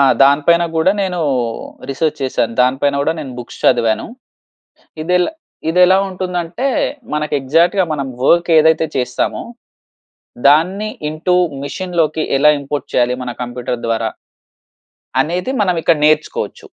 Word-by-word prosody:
ఆ! - - +6 0.2
దానిపైన 150 +5 +4
గూడా 160 +4 +3
నేను 180 -2 -2 0.7
రిసర్చ్ 155 +2 -1
చేశాను. 120 -3 -1
దానిపైన 135 +3 +1
గూడా 150 +3 +1
నేను 135 -3 -7
బుక్స్ 120 - -11
చదివాను. 110 -1 +2 1.0
ఇదెలా 180 - +1 0.4
ఇదెలా 180 +3 +5
ఉంటుందంటే, 180 +4 -4 0.5
మనకు 150 0 -2
ఎగ్జాక్ట్‌గా 170 +8 +2
మనం 140 -3 -2 0.2
వర్క్ 170 +3 +3
ఏదైతే 160 +1 +3
చేస్తామో, 125 -1 -1 1.0
దాన్ని 185 +9 +3 0.2
ఇంటూ 170 +4 0 0.3
మెషిన్‌లోకి 160 -1 -1
ఎలా 150 +2 +5
ఇంపోర్ట్ 140 0 -5
చేయాలి 125 0 +2
మన 125 - -4
కంప్యూటర్ 120 0 -4
ద్వారా? 115 -1 0 1.1
అనేది 180 +9 -2
మనం 180 -3 +1
ఇక్కడ 165 -2 +3
నేర్చుకోవచ్చు. 155 0 0
155 Hz, 120 wpm, -17 LUFS, 135-180 Hz, 1.1 s, ఆ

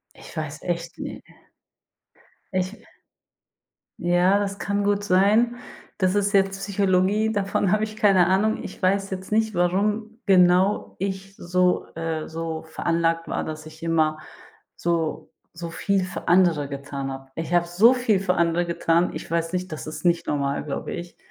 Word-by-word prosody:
Ich - - -13
weiß 155 -1 -4
echt, 170 -1 -3
ne - - -6 1.3
Ich 185 +2 0 1.3
Ja, 175 +3 +3
das 200 -1 -2
kann 205 0 -1
gut 205 0 +1
sein. 210 +6 +3 0.4
Das 185 0 +2
ist 205 0 +1
jetzt 195 -1 +3
Psychologie, 200 +2 +1
davon 200 -2 0
habe 215 0 +2
ich 215 0 -4
keine 195 -4 +4
Ahnung. 200 +4 +1
Ich 190 - -9
weiß 195 +1 +1
jetzt 190 +1 -6
nicht, 220 0 +2
warum 210 +6 0
genau 185 +1 +4
ich 195 0 -4
so 180 +1 +1
äh, 165 -1 -3
so 165 0 -4
veranlagt 165 +1 -1
war, - - -2
dass 155 0 -6
ich 160 +1 -13
immer 155 -2 +2 0.6
so 165 -2 -2 0.3
so 170 0 -5
viel 195 +3 0
für 185 - -7
andere 170 -5 +4
getan 140 -1 -5
hab. 135 0 -9
Ich 165 +1 -4
hab 175 0 +4
so 195 +8 +5
viel 245 -6 +1
für 185 -1 0
andere 170 0 +2
getan. 170 0 +1
Ich - - -7
weiß 165 +1 -1
nicht 185 0 -3
das 155 - -6
ist 155 - -7
nicht 170 -1 +2
normal, 140 -1 -1
glaube 145 -2 -4
ich. 175 0 -7
180 Hz, 160 wpm, -24 LUFS, 165-200 Hz, 1.3 s, so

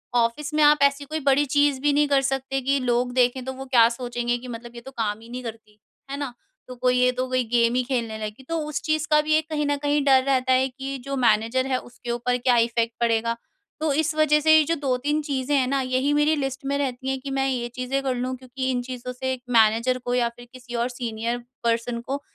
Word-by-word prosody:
Office 240 +6 0
में 305 - +2
आप 295 0 +6
ऐसी 280 0 +2
कोई 310 +2 -3
बड़ी 280 0 +3
चीज़ 285 0 +2
भी 290 0 +2
नहीं 295 +1 +3
कर 280 -1 +3
सकते 270 0 -1
कि 275 +2 +1
लोग 245 -1 0
देखें 250 0 +2
तो 265 - -4
वो 265 +1 -8
क्या 240 -3 +5
सोचेंगे 240 0 -2
कि 245 +1 -10
मतलब 240 0 -8
ये 235 - -8
तो 265 +3 -11
काम 220 -4 -2
ही 230 - -14
नहीं 250 +1 -6
करती। 220 -2 -9 0.3
है 280 - -3
ना? 280 -4 -4 0.3
तो 255 - -8
कोई 250 0 +1
ये 250 0 +4
तो 255 +1 -3
कोई 255 0 +1
गेम 235 -1 +3
ही 255 - +2
खेलने 235 -4 -2
लगी 215 +5 -8
तो 330 0 -1
उस 300 - -3
चीज़ 310 -1 0
का 300 0 +6
भी 305 +1 0
ये 310 - +4
कहीं 310 -1 -3
न 290 0 +1
कहीं 290 0 +2
डर 265 -2 +5
रहता 260 -1 +2
है 260 +1 +3
कि 265 +1 -10
ये 275 0 -3
जो 275 - -2
मैनेजर 230 +2 +2
है 260 -1 +1
उसके 240 0 -8
ऊपर 245 +1 0
क्या 245 0 +2
इफेक्ट 230 0 -1
पड़ेगा? 230 0 +1 0.4
तो 310 -1 0
इस 310 +2 +1
वजह 305 -1 +4
से 315 +1 +6
ये 310 - +5
जो 330 - 0
2-3 285 +1 -1
चीज़ें 285 -1 -1
हैं 260 -2 +2
ना, 275 +1 0
यही 260 +2 0
मेरी 295 +1 +3
लिस्ट 270 -1 -4
में 280 +1 0
रहती 265 -2 -3
हैं 265 0 -1
कि 275 +1 -7
मैं 270 0 0
ये 245 -2 -2
चीज़ें 255 +2 -1
कर 260 -2 0
लूँ 255 +1 -2
क्योंकि 260 +1 -4
इन 250 -1 -1
चीज़ों 250 0 -6
से 260 +1 -3
मैनेजर 230 +2 +3
को 245 - -1
या 240 -1 +2
फिर 240 +1 -15
किसी 245 -1 -9
और 235 +1 0
सीनियर 235 -1 -3 0.3
पर्सन 235 0 0
को 275 +4 -4
255 Hz, 250 wpm, -24 LUFS, 240-280 Hz, 0.4 s, आप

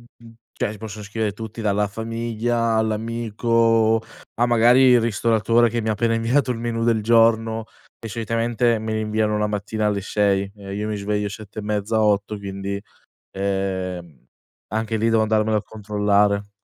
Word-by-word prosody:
d 115 -1 -16 0.2
cioè, - - -2
ti - - -11
possono 105 0 -8
scrivere 105 +1 -2
tutti, 110 +2 -8
dalla 105 -1 +1
famiglia 115 +1 -1
all'amico, 115 0 +1 0.4
a 120 - +2
magari 120 +2 +5
il 125 -2 +6
ristoratore 115 +1 +2
che 115 +1 -2
mi 110 - -2
ha - - +2
appena 115 +2 0
inviato 120 +4 +1
il 115 - -4
menù 115 -1 -2
del 115 -2 +2
giorno 115 0 +3 0.3
e 115 - -8
solitamente 115 +2 0
me 110 0 -4
li 110 - -1
inviano 105 0 0
la 105 - +1
mattina 105 +1 -2
alle 100 -1 0
6 100 0 0
e 100 -1 -8
io 105 +1 -3
mi 110 - -2
sveglio 105 0 -2
7 105 0 -11
e - - -4
mezza 105 +1 -1
8, 105 0 +1
quindi, 100 0 -5 0.5
ehm, 95 -5 -3 0.5
anche 110 0 -1
lì 110 +1 +1
devo 115 -1 +3
andarmelo 110 0 +1
a 105 - -3
controllare. 105 -1 0
110 Hz, 170 wpm, -22 LUFS, 105-115 Hz, 0.5 s, il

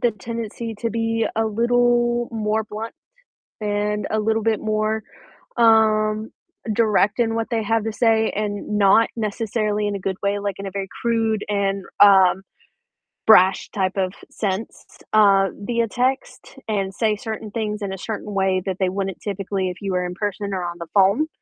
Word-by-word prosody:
the 240 - +3
tendency 225 +1 -6
to 230 -1 -1
be 225 0 0
a 225 - +2
little 240 +1 +2
more 220 -1 -1
blunt 220 +2 -6 0.7
and 210 0 -1
a 215 0 +1
little 220 +1 0
bit 220 -1 +1
more, 215 0 -1 0.5
um, 220 -2 +3 0.4
direct 210 0 +2
in 225 -1 +1
what 225 0 -2
they 225 -1 0
have 225 +1 0
to 225 - -2
say, 225 -1 +2
and 210 0 -2
not 205 +3 +5
necessarily 210 -1 -1
in 205 - -2
a 195 - -7
good 190 0 -2
way, 200 0 0
like 200 -2 -3
in 200 - -6
a - - -4
very 195 0 -4
crude 225 -2 0
and, 200 -1 -1 0.2
um, 190 -2 +6 0.9
brash 190 -3 +5
type 190 -2 -1
of 185 -1 0 0.2
sense, 200 +1 -4 0.3
uh, 200 -2 +5
via 235 +3 -1
text, 255 +5 -2
and 195 -3 -1
say 215 +1 +1
certain 215 0 -6
things 215 -1 -3
in 195 -1 -3
a - - -5
certain 210 +1 -5
way 190 -1 +1
that 190 -2 -2
they 190 -1 +2
wouldn't 195 0 -3
typically 195 -1 -2
if 180 - -7
you 195 -1 -3
were 180 0 0
in 180 - -4
person 200 +1 -3
or 185 -2 -2
on 175 0 -4
the 170 - -7
phone, 200 +10 +4
210 Hz, 175 wpm, -22 LUFS, 195-225 Hz, 0.9 s, um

